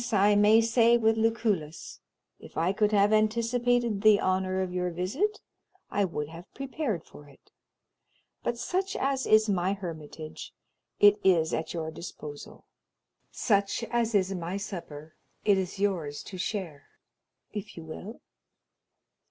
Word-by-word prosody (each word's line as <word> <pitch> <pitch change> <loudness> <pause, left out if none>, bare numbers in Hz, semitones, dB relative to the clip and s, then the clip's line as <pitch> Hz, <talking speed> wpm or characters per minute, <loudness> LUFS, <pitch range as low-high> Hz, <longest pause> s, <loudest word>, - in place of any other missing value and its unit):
I 205 +1 +5
may 210 +2 +6
say 230 +1 +4
with 225 -1 +3
Lucullus, 220 -8 -1 0.4
if - - -13
I 170 +4 +2
could 210 +1 +2
have 205 0 +4
anticipated 230 0 +1
the 215 -1 +6
honor 185 0 0
of 180 -1 -5
your 180 0 -1
visit, 235 - -2 0.5
I 205 - +2
would 150 -5 -4
have 165 +3 -12
prepared 270 - -3
for 145 -1 -15
it. 140 - -22 0.9
But 240 - -2
such 370 +11 -2
as 270 -1 0
is 215 0 +5
my 190 -1 +1
hermitage, 160 -5 -8 0.4
it 205 0 +6
is 165 -4 +3
at 160 - -2
your 160 -1 -3
disposal; 150 -3 -9 0.6
such 200 0 0
as 235 -2 +1
is 195 -1 +2
my 180 +1 -3
supper, 160 -6 -7 0.3
it 205 - +5
is 185 +1 -4
yours 175 -8 -1
to 190 - -8
share, 180 -7 -4 0.7
if 205 -4 -7
you 165 - -7
will. 180 +8 -9
200 Hz, 140 wpm, -28 LUFS, 170-225 Hz, 0.9 s, may